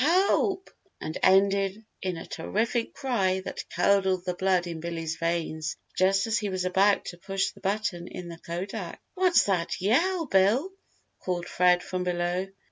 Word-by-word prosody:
Help!" 375 +4 +2 0.3
and 155 - -5
ended 195 +2 +3 0.2
in 185 -2 -2
a - - -7
terrific 225 +7 -1
cry 195 -9 0
that - - -6
curdled 190 0 +2
the 180 - -1
blood 185 0 +1
in 170 -2 -5
Billy's 165 -1 -4
veins 160 -2 -2 0.2
just 195 +1 +3
as 225 0 +1
he 210 - -2
was 185 -1 -2
about 195 +2 +3
to 175 - -7
push 195 +1 -1
the - - -17
button 195 -3 -2
in 180 -1 -7
the 170 -1 -9
kodak. 180 +2 -5
"What's 365 -1 +4
that 180 -4 -1
yell, 330 - +2
Bill?" 230 - +3 0.5
called 175 -1 -2
Fred 180 0 +3
from 185 -1 -3
below. 180 +1 -1
190 Hz, 160 wpm, -27 LUFS, 175-205 Hz, 0.5 s, What's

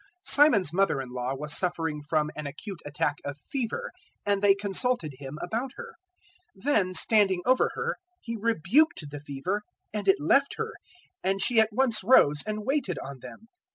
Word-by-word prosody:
Simon's 230 - +4
mother 195 -6 +2
in 130 -2 -6
law 125 +1 -3
was 150 +2 -2
suffering 165 -4 -1
from 150 0 0
an 150 -1 -5
acute 170 +6 -8
attack 145 0 -1
of 145 0 -5
fever; 270 - -4 0.3
and 200 -1 +1
they 200 -1 +5
consulted 200 - 0
Him 140 +1 -8
about 240 +7 -3
her. - - -9 0.6
004:039 - - -18
Then 210 -10 +2
standing 195 -5 +3
over 255 0 +3
her - - -2 0.2
He 230 -1 -6
rebuked 225 - +1
the 145 - -6
fever, 145 +8 -3 0.3
and 205 -2 -4
it 195 - +5
left 275 - +3
her; 450 0 -3 0.5
and 195 +1 0
she 225 +3 +3
at 220 0 +4
once 230 -2 +2
rose 150 - +5
and 215 0 -3
waited 265 - -1
on 140 -1 -7
them. 125 - -11
195 Hz, 175 wpm, -27 LUFS, 150-230 Hz, 0.6 s, they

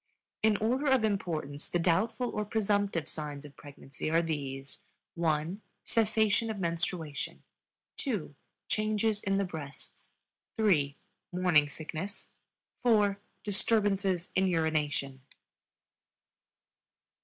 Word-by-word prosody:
In 215 -1 +4
order 250 +7 +1
of 265 -4 +4
importance 165 -8 -1
the - - +1
doubtful 215 +9 +2
or 210 - -1
presumptive 205 -6 0
signs 150 -2 -4
of 145 - -12
pregnancy 140 0 -6
are 165 +2 +3
these: 140 -4 -4 0.3
(1) 165 +3 0 0.2
cessation 220 0 +2
of 220 - -3
menstruation, 170 -3 -2 0.5
(2) 210 - -2 0.3
changes 215 0 +1
in 195 0 +1
the 200 - +2
breasts, 155 -6 -9 0.4
(3) 150 -10 +3 0.3
morning 175 -5 +4
sickness, 160 +6 -6 0.5
(4) 210 -5 +4 0.3
disturbances 200 -3 +2
in 190 0 +3
urination. 150 -5 0
180 Hz, 100 wpm, -31 LUFS, 155-210 Hz, 0.5 s, In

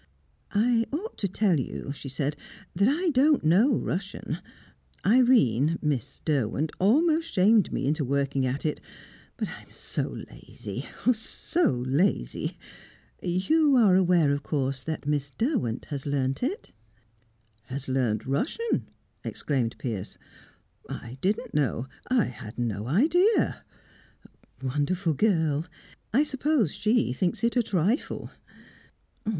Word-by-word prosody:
"I 230 +2 +3
ought 370 +11 -4
to 200 - 0
tell 190 -4 +2
you," 135 +2 -4
she 140 -1 -8
said, 140 +2 -2 0.4
"that 200 +4 +3
I 335 +7 +2
don't 285 - +4
know 205 - +4
Russian. 185 +3 -3 0.7
Irene 170 - +4
Miss 145 -7 -2
Derwent 145 0 0
almost 320 - +3
shamed 205 +2 +4
me - - -1
into 150 +2 +1
working 140 0 0
at 135 +5 -3
it; 155 - -1 0.6
but - - -2
I - - -9
am - - -21
so - - -3 0.2
lazy - - -8 0.2
ah, 250 - +6
so 250 - 0
lazy! 135 - 0 0.6
you 270 - +3
are 220 -7 +6
aware, 175 -5 +4
of 140 0 0
course, 135 -3 -1
that 160 -2 -4
Miss 145 -1 0
Derwent 220 - -1
has 140 -1 -4
learnt 135 -2 0
it?" 335 - -3 0.9
"Has 135 +2 -6
learnt 125 -5 0
Russian?" 280 - -1 0.3
exclaimed 125 -6 -1
Piers. 110 -7 -5 0.7
"I 120 +3 -7
didn't 200 +3 -1
know 135 -4 0 0.2
I 255 -3 +3
had 110 -2 -9
no 110 -3 -2
idea 340 - +3 0.5
" - - -24
"Wonderful 155 +6 0
girl! 160 -4 +1 0.4
I 270 +7 +4
suppose 275 - +1
she 210 - +1
thinks 175 - -1
it 235 +1 +2
a 245 - +4
trifle." 205 - -1
170 Hz, 130 wpm, -27 LUFS, -, 0.9 s, ah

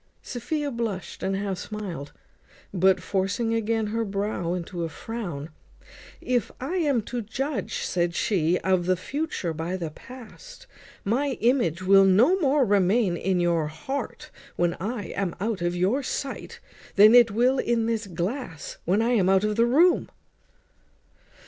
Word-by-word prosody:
Sophia 285 +4 -3
blushed 225 -6 -4
and 195 +1 -1
half 195 -2 -3
smiled; 185 -9 -6 0.6
but, 190 0 +4
forcing 200 +4 -1
again 225 0 0
her 225 +2 -1
brow 195 -4 -2
into 175 0 -4
a 165 - -2
frown 175 -8 -6 0.7
"If 245 -2 0
I 300 +9 -3
am 285 -9 +1
to 245 +2 -4
judge," 265 +7 -3
said 175 -1 -1
she, 175 -4 +1
"of 185 -2 +1
the 185 - +3
future 275 - -3
by 165 +4 -3
the 165 -4 -4
past, 255 - -13 0.4
my 260 +6 0
image 215 - +1
will 195 +1 +6
no 215 - +5
more 285 -4 +3
remain 200 -1 +2
in 185 +1 0
your 170 -3 +1
heart 265 - -6 0.2
when 175 -1 +1
I 210 -2 -3
am 190 -3 -2
out 210 -1 -2
of 175 0 0
your 195 +10 +1
sight, 275 +1 -5 0.4
than 210 +2 +8
it 240 -2 +7
will 245 +5 +2
in 235 -2 +1
this 225 -2 -1
glass 180 - -4
when 195 +6 +2
I 235 - +1
am 195 -6 +3
out 195 +1 +4
of 210 0 0
the 230 +2 +3
room." 335 +9 +4
205 Hz, 155 wpm, -25 LUFS, 180-245 Hz, 0.7 s, than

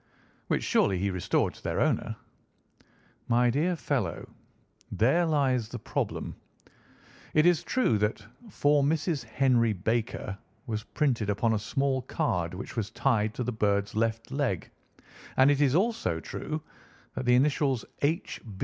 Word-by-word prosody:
"Which - - 0
surely 95 - +2
he 100 +2 0
restored 90 -1 0
to - - -17
their - - -1
owner?" - - +1 1.1
"My 120 0 +3
dear 165 +8 +1
fellow, 140 -8 -2 0.6
there 165 +10 +3
lies 130 -7 +1
the - - -5
problem. - - -3 1.0
It 155 +1 +5
is 175 -3 +4
true 250 - +1
that 105 0 -1 0.2
'For 145 -5 +3
Mrs. 155 0 0
Henry 115 -1 +2
Baker' 105 0 -2 0.3
was 110 -4 -3
printed 120 -3 0
upon 110 +3 +1
a 110 - +1
small 130 +4 0
card 90 -8 -1
which 95 - -7
was 110 -4 -2
tied 110 -2 +1
to 125 - -2
the 125 - -2
bird's 100 -3 0
left 115 +1 -1
leg, 130 - -1 0.7
and 130 +2 +6
it 145 0 +1
is 140 -1 +3
also 190 - +1
true 155 - -5 0.5
that 130 -1 -4
the 125 - +6
initials 135 -2 +2 0.2
'H. 155 +4 -1
125 Hz, 145 wpm, -28 LUFS, 110-145 Hz, 1.1 s, and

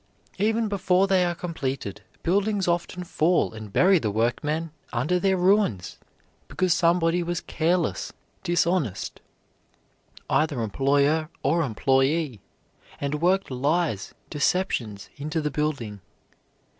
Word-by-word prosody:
Even 220 +2 +2
before 190 -2 +2
they 190 -2 +3
are 175 -1 0
completed, 135 - -4 0.2
buildings 200 +2 +1
often 175 +1 -1
fall 170 -5 +1
and 110 -2 -9
bury 185 - +5
the 110 - -1
workmen 150 +9 -1 0.2
under 150 +10 +1
their 190 0 +2
ruins, 180 - +1 0.5
because 185 -2 +1
somebody 170 0 +2
was 175 0 -2
careless, 170 +1 0 0.3
dishonest 175 - 0 1.1
either 155 -4 +1
employer 140 +7 +2
or 165 +5 +2
employee 135 - +1 0.6
and 145 +2 -2
worked 185 -1 +2
lies, 140 - -1 0.2
deceptions, 140 - -1
into 150 +3 -2
the 150 -1 -2
building. 135 -10 -2
160 Hz, 110 wpm, -25 LUFS, 135-180 Hz, 1.1 s, bury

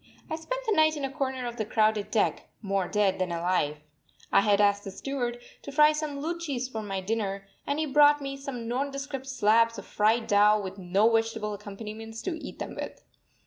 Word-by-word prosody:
I - - 0
spent - - -4
the 435 -3 +2
night 310 -1 +4
in 280 - -2
a 270 - -4
corner 265 -3 -2
of 240 0 -5
the 220 - 0
crowded 215 -1 +1
deck, 220 - 0
more 195 -2 0
dead 200 -1 +1
than 185 -1 -1
alive. 170 -4 0 0.5
I - - +6
had 205 -1 +3
asked 205 0 +3
the - - -6
steward 245 +3 -3 0.2
to 280 - -8
fry 300 +2 +6
some 305 -2 -3
luchis 300 -5 -3
for 225 -4 -5
my 195 -2 -3
dinner, 200 -1 -2 0.2
and 285 - 0
he 315 - 0
brought 295 +1 +5
me 275 -1 -4
some 275 -4 -6
nondescript 275 +2 -3
slabs 230 -2 +3
of 200 - -8
fried 225 +2 +2
dough 210 0 +5
with 195 -1 -6
no 190 +4 +3
vegetable 225 -2 0
accompaniments 215 +2 -8
to 365 - -2
eat - - -8
them - - -5
with. - - -7
225 Hz, 200 wpm, -28 LUFS, 205-275 Hz, 0.5 s, I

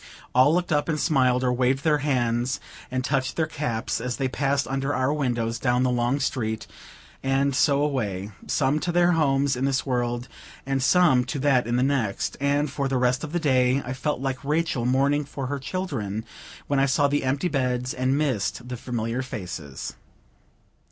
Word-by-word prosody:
All 130 +4 +6
looked 175 +1 0
up 145 +1 +1
and 155 -2 0
smiled, 130 -5 +2
or 125 -1 +2
waved 130 +2 +1
their 150 -2 +3
hands 125 -3 0 0.3
and 130 0 -2
touched 135 -2 0
their 160 - +1
caps, 120 -7 -2
as 125 0 -3
they 135 - 0
passed 140 +1 0
under 135 +1 -1
our 130 +3 +1
windows 120 -5 -1
down 125 +1 +2
the 130 - +2
long 120 +3 +1
street, 110 -5 -2 0.6
and 135 0 +1
so 140 +1 +3
away, 105 -9 -2 0.2
some 140 +2 +1
to 175 - -2
their 175 0 +4
homes 140 -4 +2
in 130 +2 -1
this 135 -1 0
world, 120 -2 -1 0.4
and 135 0 0
some 145 -3 +4
to 130 - -4
that 130 -4 +3
in 120 - 0
the 125 - +2
next; 130 -7 0
and, 140 0 +1
for 140 -1 -1
the 135 -1 0
rest 125 +2 +1
of 150 - -5
the 175 - 0
day, 130 -3 +2
I 125 - -3
felt 140 +3 -2
like 135 0 -3
Rachel 150 -4 0
mourning 140 +3 +2
for 140 -1 -6
her 140 +2 -3
children, 120 - -3 0.4
when 140 -1 +1
I 135 - +3
saw 140 +2 +3
the 145 0 0
empty 140 +6 0
beds 125 -4 -1
and 130 +2 +1
missed 125 -4 -1
the 125 - -4
familiar 120 0 -3
faces. 90 - -6
130 Hz, 190 wpm, -25 LUFS, 125-145 Hz, 0.6 s, All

